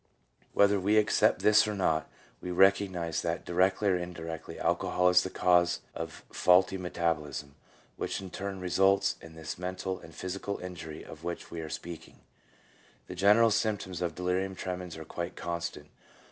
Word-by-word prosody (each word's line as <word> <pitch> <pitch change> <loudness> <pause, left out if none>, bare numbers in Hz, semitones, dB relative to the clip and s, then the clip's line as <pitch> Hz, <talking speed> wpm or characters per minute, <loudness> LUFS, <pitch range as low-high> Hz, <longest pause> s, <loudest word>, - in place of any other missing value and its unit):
Whether 100 0 +4
we 105 +3 +2
accept 105 - +3
this 105 0 +6
or 105 - -2
not, 80 -5 0 0.3
we 90 - -5
recognize 95 -3 +2
that 85 0 -2
directly 95 +3 +2
or 90 - +3
indirectly 85 -2 -6
alcohol 90 0 +2
is 90 0 +6
the 95 - -3
cause 90 -1 +3
of 80 0 -7
faulty 90 +1 +4
metabolism, 75 -6 -2 0.4
which - - -2
in 95 -2 -8
turn 100 0 -5
results 95 +2 +3
in 80 0 -12
this 80 +1 -6
mental 95 +1 -3
and 80 - -14
physical 95 +2 -4
injury 85 -4 -8
of 80 +1 -11
which 85 0 -5
we 85 - -5
are 80 - -6
speaking. 85 -1 -8 0.8
The - - -8
general 105 +5 +5
symptoms 100 -5 -1
of 85 -3 -2
delirium 90 +1 -1
tremens 90 -2 -5
are 80 - -8
quite 85 +3 -5
constant. 85 -3 -5
90 Hz, 160 wpm, -30 LUFS, 85-95 Hz, 0.8 s, this